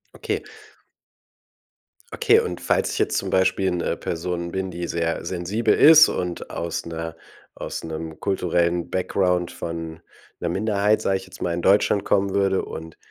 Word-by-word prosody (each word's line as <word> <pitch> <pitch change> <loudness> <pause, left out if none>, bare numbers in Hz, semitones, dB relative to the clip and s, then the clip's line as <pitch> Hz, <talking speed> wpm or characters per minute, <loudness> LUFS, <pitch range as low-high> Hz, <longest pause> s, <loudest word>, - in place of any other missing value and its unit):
Okay. - - -3 1.7
Okay. - - +4
Und 90 -1 -3
falls - - +1
ich - - -3
jetzt - - +1
zum - - -2
Beispiel 95 0 +2
'ne 90 -1 -1
Person 85 +1 -4
bin, 95 0 -3
die 85 0 -4
sehr 85 -1 -2
sensibel 100 +6 0
ist 155 0 +8
und 90 -1 -4
aus 85 -1 -4
'ner 80 0 -5 0.4
aus - - -6
'nem 80 0 -6
kulturellen 85 -3 0
Background 90 -1 0
von 80 -1 -6 0.4
'ner 85 - -2
Minderheit, 105 +3 +1
sage 95 -2 +1
ich 95 - -10
jetzt - - -14
mal, 85 - -1
in 85 - -2
Deutschland 100 +1 +3
kommen 100 -1 +1
würde 95 -1 +1
und 80 0 -9
90 Hz, 155 wpm, -23 LUFS, 85-95 Hz, 1.7 s, ist